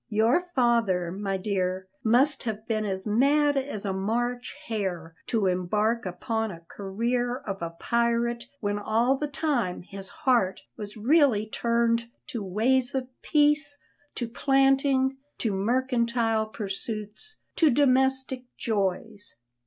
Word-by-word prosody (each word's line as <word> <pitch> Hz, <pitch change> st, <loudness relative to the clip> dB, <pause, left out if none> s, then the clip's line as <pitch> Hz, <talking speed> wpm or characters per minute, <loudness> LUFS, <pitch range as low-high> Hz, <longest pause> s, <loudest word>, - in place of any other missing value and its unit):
Your 235 Hz, +12 st, +2 dB
father, 230 Hz, -9 st, +2 dB
my 195 Hz, +1 st, -2 dB
dear, 185 Hz, -1 st, -2 dB, 0.2 s
must 265 Hz, +5 st, +4 dB
have 220 Hz, -2 st, -4 dB
been 215 Hz, -2 st, 0 dB
as 190 Hz, -2 st, -3 dB
mad 285 Hz, +7 st, +3 dB
as 265 Hz, -7 st, -3 dB
a 195 Hz, -, -1 dB
March 240 Hz, +5 st, -2 dB
hare 185 Hz, -7 st, -3 dB
to 225 Hz, -5 st, +1 dB
embark 210 Hz, +5 st, 0 dB
upon 220 Hz, +5 st, -2 dB
a 170 Hz, -4 st, -9 dB
career 240 Hz, +6 st, -2 dB
of 195 Hz, -6 st, -6 dB
a 170 Hz, -, -2 dB
pirate 235 Hz, 0 st, 0 dB, 0.2 s
when 205 Hz, -1 st, -1 dB
all 230 Hz, +5 st, +2 dB
the 295 Hz, +2 st, -2 dB
time 275 Hz, -, -1 dB
his 195 Hz, 0 st, -8 dB
heart 235 Hz, -8 st, +1 dB
was 210 Hz, +1 st, -7 dB
really 250 Hz, -2 st, +4 dB
turned 235 Hz, +1 st, +1 dB, 0.2 s
to 230 Hz, -, -4 dB
ways 245 Hz, +7 st, +1 dB
of 260 Hz, -1 st, -2 dB
peace, 295 Hz, 0 st, +2 dB, 0.4 s
to 240 Hz, -, -2 dB
planting, 270 Hz, +1 st, +2 dB, 0.2 s
to 220 Hz, -4 st, -1 dB
mercantile 235 Hz, 0 st, +1 dB
pursuits, 215 Hz, -, -5 dB, 0.2 s
to 320 Hz, -, +5 dB
domestic 265 Hz, -1 st, +2 dB, 0.2 s
joys." 205 Hz, 0 st, -2 dB
230 Hz, 130 wpm, -27 LUFS, 205-260 Hz, 0.4 s, to